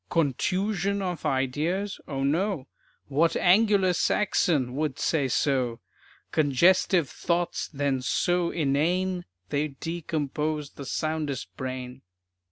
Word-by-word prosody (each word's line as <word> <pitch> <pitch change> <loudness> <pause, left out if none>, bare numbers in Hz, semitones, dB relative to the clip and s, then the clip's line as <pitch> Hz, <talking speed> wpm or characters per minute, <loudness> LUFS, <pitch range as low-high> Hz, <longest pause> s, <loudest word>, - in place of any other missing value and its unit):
"Contusion 190 - 0
of 180 -4 -2
ideas." 155 +10 -1
O 135 -2 -3
no; 165 +1 0 0.4
What 155 +4 +2
"Angular 195 0 +4
Saxon" 160 -9 +1
would 150 -2 -1
say 145 -5 +1
so? 125 -3 0 0.5
"Congestive 165 +3 +3
thoughts 175 +4 -1
then 140 -3 0
so 175 +6 +1
inane 175 +5 0 0.2
They'd 145 -1 -2
decompose 155 -2 -2
the 140 - -9
soundest 155 -3 -3
brain." 130 0 -5
155 Hz, 100 wpm, -27 LUFS, 135-180 Hz, 0.5 s, Angular